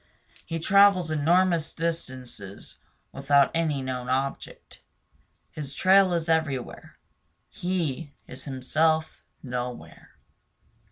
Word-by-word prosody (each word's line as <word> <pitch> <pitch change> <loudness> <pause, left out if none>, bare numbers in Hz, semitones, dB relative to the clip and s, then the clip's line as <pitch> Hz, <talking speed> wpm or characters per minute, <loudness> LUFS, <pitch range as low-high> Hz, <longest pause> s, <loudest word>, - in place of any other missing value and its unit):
He 165 - -3
travels 190 -1 +4
enormous 165 +2 +2
distances 130 - -6 0.3
without 140 0 +3
any 155 -5 0
known 125 -1 -4
object. 135 +2 -4 0.7
His 145 -2 -7
trail 190 0 +5
is 170 -1 -1
everywhere; 155 -6 -2 0.5
he 165 -5 -3
is 130 +1 -9
himself 155 +4 0 0.2
nowhere. 125 -1 -7
155 Hz, 90 wpm, -26 LUFS, 130-170 Hz, 0.7 s, trail